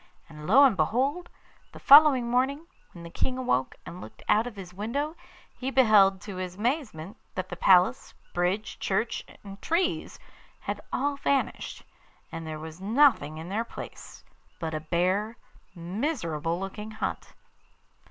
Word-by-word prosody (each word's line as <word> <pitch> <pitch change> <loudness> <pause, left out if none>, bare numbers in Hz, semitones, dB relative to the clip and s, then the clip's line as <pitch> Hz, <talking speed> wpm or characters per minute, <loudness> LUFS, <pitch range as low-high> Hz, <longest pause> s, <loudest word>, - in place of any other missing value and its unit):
And 150 -1 -10
lo 265 +9 +7
and 260 -7 +5
behold! 260 - 0 0.4
the - - -10
following 280 -4 +7
morning, 265 +6 0 0.3
when 170 - -12
the 170 - -9
King 255 +7 -2
awoke 130 - 0
and 180 +2 -9
looked - - -12
out 220 +3 +3
of 240 - -8
his 185 -2 -9
window 275 - -3 0.4
he 260 - -4
beheld 210 -8 +5
to 195 -1 -8
his 185 -1 -5
amazement 215 - -3 0.2
that 185 0 -4
the 175 - -5
palace, 180 0 +3 0.2
bridge, 180 +5 -1
church, 225 +4 -1 0.2
and 200 -1 -11
trees 345 +2 -1 0.4
had - - -4
all 280 +2 -1
vanished, 280 -1 -1 0.5
and 165 -1 -6
there 155 -1 -5
was 160 +3 -9
nothing 215 - +3
in 160 +2 -7
their 215 +4 -1
place 235 - -10 0.4
but 160 -1 -4
a 155 - -2
bare, 185 +8 0 0.4
miserable 170 - -2
looking 200 +3 -6
hut. 215 0 -5
205 Hz, 150 wpm, -27 LUFS, 175-255 Hz, 0.5 s, lo